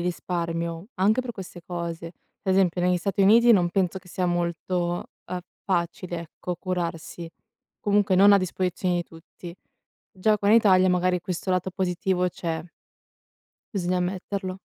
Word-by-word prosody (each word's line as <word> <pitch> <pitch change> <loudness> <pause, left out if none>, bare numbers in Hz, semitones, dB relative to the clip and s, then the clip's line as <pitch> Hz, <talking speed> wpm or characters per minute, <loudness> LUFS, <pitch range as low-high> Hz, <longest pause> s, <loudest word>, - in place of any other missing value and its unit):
risparmio, 170 -1 -3
anche 210 +6 +3
per 245 -2 -5
queste 185 -3 -9
cose, 170 -1 -5 0.3
esempio 190 -2 +2
negli 180 0 +3
Stati 195 +3 -2
Uniti 230 +4 +7
non 175 -4 +4
penso 190 0 0
che 180 - -19
sia 180 +1 -2
molto, 175 0 -1 0.2
ehm, 180 - -3 0.2
facile, 175 -1 -2
ecco, 175 +2 -6
curarsi. 170 -2 -4 0.5
Comunque 205 -1 +2
non 200 +2 +7
a 200 - +7
disposizione 185 0 -1
di 175 - 0
tutti. 170 +1 -12 0.6
Già 210 +3 +1
qua 200 - 0
in 220 - +7
Italia 185 -4 +5
magari 180 0 +2
questo 180 +1 -4
lato 185 0 0
positivo 180 0 0
c'è. 165 -2 -4 1.1
Bisogna 180 -1 0
ammetterlo. 185 +1 -3
180 Hz, 145 wpm, -25 LUFS, 175-190 Hz, 1.1 s, Uniti